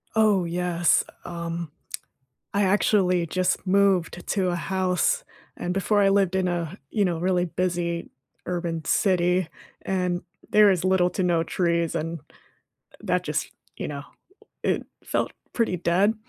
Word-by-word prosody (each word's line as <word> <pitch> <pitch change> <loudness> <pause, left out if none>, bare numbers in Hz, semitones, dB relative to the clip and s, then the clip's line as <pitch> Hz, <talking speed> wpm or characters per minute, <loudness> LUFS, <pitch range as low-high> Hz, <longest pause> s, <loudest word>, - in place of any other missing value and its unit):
Oh, 210 -4 +4
yes, 175 0 +2 0.2
um, 170 -1 -5 0.8
I 200 - +3
actually 185 -3 +3
just 185 +3 0
moved 185 -3 +2
to 190 -3 +1
a 175 - 0
house, 190 - 0 0.3
and 180 - -3
before 205 +2 +2
I 195 - +5
lived 195 -2 +2
in 190 -1 +1
a, 170 -3 -3
you 210 - +1
know, 175 -3 0
really 180 +1 +1
busy 175 -1 -2 0.4
urban 170 -3 -2
city, 180 -3 +2 0.3
and 180 -2 -1 0.3
there 210 -1 +7
is 185 -2 +1
little 185 -1 +3
to 185 - -2
no 175 -2 +2
trees, 170 -1 0
and, 165 0 -3
uh, - - -27 0.7
that - - 0
just, - - -2 0.3
you - - -4
know, 140 -1 -5 0.6
it - - 0 0.2
felt - - -1 0.2
pretty 225 -6 +1
dead. 185 +6 +2
180 Hz, 145 wpm, -25 LUFS, 170-190 Hz, 0.8 s, there